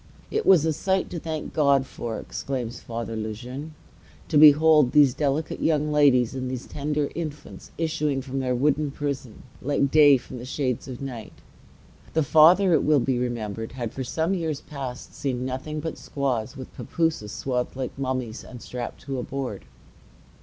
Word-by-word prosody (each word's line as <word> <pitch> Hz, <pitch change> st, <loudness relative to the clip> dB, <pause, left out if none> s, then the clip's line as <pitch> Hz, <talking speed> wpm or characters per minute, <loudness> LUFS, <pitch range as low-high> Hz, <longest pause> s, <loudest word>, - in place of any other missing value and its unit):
"It 440 Hz, +1 st, -1 dB
was 170 Hz, -5 st, +6 dB
a 160 Hz, -, +2 dB
sight 190 Hz, +4 st, 0 dB
to 170 Hz, -, -4 dB
thank 160 Hz, -1 st, -5 dB
God 140 Hz, -3 st, +3 dB
for," 115 Hz, -4 st, -5 dB
exclaims 125 Hz, -3 st, -5 dB
Father 115 Hz, -1 st, -5 dB
Le 110 Hz, 0 st, -3 dB
Jeune, 130 Hz, +7 st, -8 dB, 0.5 s
"to 155 Hz, -, +3 dB
behold 150 Hz, -2 st, +7 dB
these 145 Hz, -4 st, +6 dB
delicate 145 Hz, +2 st, -1 dB
young 150 Hz, -1 st, +1 dB
ladies 135 Hz, -5 st, +4 dB
and 130 Hz, -1 st, -3 dB
these 130 Hz, -1 st, -5 dB
tender 150 Hz, 0 st, -2 dB
infants 155 Hz, -3 st, -7 dB
issuing 150 Hz, -4 st, -1 dB
from 135 Hz, 0 st, -4 dB
their 130 Hz, -1 st, 0 dB
wooden 145 Hz, +3 st, +1 dB
prison, 140 Hz, -4 st, -5 dB, 0.2 s
like 140 Hz, 0 st, +1 dB
day 145 Hz, -2 st, +7 dB
from 125 Hz, 0 st, -9 dB
the -, -, -8 dB
shades 130 Hz, -2 st, -2 dB
of 130 Hz, 0 st, -7 dB
night." 120 Hz, -5 st, -7 dB, 0.8 s
The 160 Hz, -, +3 dB
Father, 170 Hz, +6 st, +6 dB
it -, -, +3 dB
will 150 Hz, -2 st, +4 dB
be 125 Hz, 0 st, 0 dB
remembered, 115 Hz, -3 st, -3 dB
had 120 Hz, -4 st, -4 dB
for 130 Hz, -, -4 dB
some 160 Hz, +8 st, -1 dB
years 160 Hz, -6 st, -2 dB
past 135 Hz, -5 st, -7 dB
seen 130 Hz, -3 st, -2 dB
nothing 130 Hz, +4 st, -4 dB
but 160 Hz, +1 st, -5 dB
squaws, 130 Hz, -2 st, -2 dB
with 130 Hz, -, -9 dB
papooses 160 Hz, -11 st, -1 dB
swathed 125 Hz, 0 st, -2 dB
like 130 Hz, -1 st, -4 dB
mummies 130 Hz, -4 st, -3 dB
and 125 Hz, -, -10 dB
strapped 120 Hz, 0 st, -6 dB
to 135 Hz, -2 st, -4 dB
a -, -, -3 dB
board. 130 Hz, -8 st, -5 dB
135 Hz, 175 wpm, -25 LUFS, 125-150 Hz, 0.8 s, behold